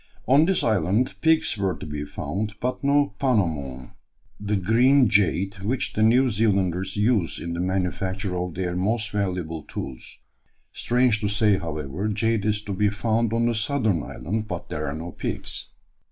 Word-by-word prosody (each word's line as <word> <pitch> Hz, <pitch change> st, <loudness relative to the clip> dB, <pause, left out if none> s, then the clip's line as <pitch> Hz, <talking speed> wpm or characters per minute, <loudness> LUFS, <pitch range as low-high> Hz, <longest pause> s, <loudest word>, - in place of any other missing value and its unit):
On 140 Hz, +6 st, +6 dB
this 190 Hz, +1 st, +1 dB
island 110 Hz, +4 st, +1 dB
pigs 160 Hz, -5 st, +3 dB
were 95 Hz, -2 st, 0 dB
to -, -, -8 dB
be 75 Hz, -1 st, -5 dB
found, 100 Hz, +9 st, -4 dB
but 125 Hz, +2 st, -3 dB
no 145 Hz, +1 st, +3 dB
"pounamon" 80 Hz, -, -1 dB, 0.5 s
the 105 Hz, +1 st, -1 dB
green 120 Hz, +7 st, +4 dB
jade 95 Hz, -1 st, +1 dB
which 115 Hz, +6 st, -1 dB
the 110 Hz, -, -1 dB
New 120 Hz, +4 st, +5 dB
Zealanders 95 Hz, -3 st, 0 dB
use 105 Hz, -5 st, +1 dB
in 85 Hz, -, -4 dB
the 85 Hz, -, -4 dB
manufacture 95 Hz, +1 st, -1 dB
of 90 Hz, -1 st, -3 dB
their 90 Hz, -1 st, -2 dB
most 105 Hz, +4 st, 0 dB
valuable 90 Hz, -6 st, -2 dB
tools; 65 Hz, -3 st, -8 dB, 0.6 s
strange 120 Hz, -2 st, +2 dB
to 105 Hz, -, 0 dB
say, 105 Hz, -1 st, +2 dB
however, 80 Hz, +3 st, -4 dB
jade 110 Hz, 0 st, 0 dB
is 105 Hz, -1 st, 0 dB
to 100 Hz, -, -4 dB
be 105 Hz, +2 st, +2 dB
found 110 Hz, +2 st, 0 dB
on 115 Hz, +1 st, +1 dB
the 120 Hz, -, +2 dB
southern 110 Hz, -, 0 dB
island, 105 Hz, +9 st, -4 dB
but -, -, -6 dB
there 75 Hz, +1 st, -3 dB
are 70 Hz, -, -3 dB
no 85 Hz, +2 st, -6 dB
pigs. -, -, -3 dB
100 Hz, 170 wpm, -24 LUFS, 90-115 Hz, 0.6 s, On